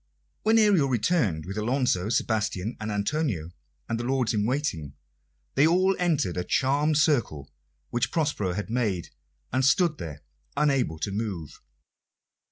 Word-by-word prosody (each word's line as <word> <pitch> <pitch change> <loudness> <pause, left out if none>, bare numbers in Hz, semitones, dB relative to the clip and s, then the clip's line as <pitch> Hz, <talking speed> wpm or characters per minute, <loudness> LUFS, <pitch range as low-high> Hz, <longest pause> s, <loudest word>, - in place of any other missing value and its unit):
When 220 +1 +3
Ariel 200 -10 +4
returned 115 - +1
with 100 +3 -4
Alonso, 115 -4 0
Sebastian, 110 -2 -1
and 110 0 -4
Antonio, 105 - -1 0.4
and 115 -1 -2
the - - -3
lords 125 -2 0
in 105 0 +1
waiting, 100 - -2 0.6
they 140 +3 +4
all 185 +3 +3
entered 155 - +1
a 90 - 0
charmed 145 - +1
circle 120 - +1 0.4
which 120 - 0
Prospero 145 - 0
had 105 +3 -4
made, 105 -8 -1 0.4
and 130 +1 +2
stood 150 +4 +3
there 75 -3 -7 0.3
unable 135 - +1
to 100 +6 -3
move. 95 -7 -5
120 Hz, 140 wpm, -26 LUFS, 95-150 Hz, 0.6 s, Ariel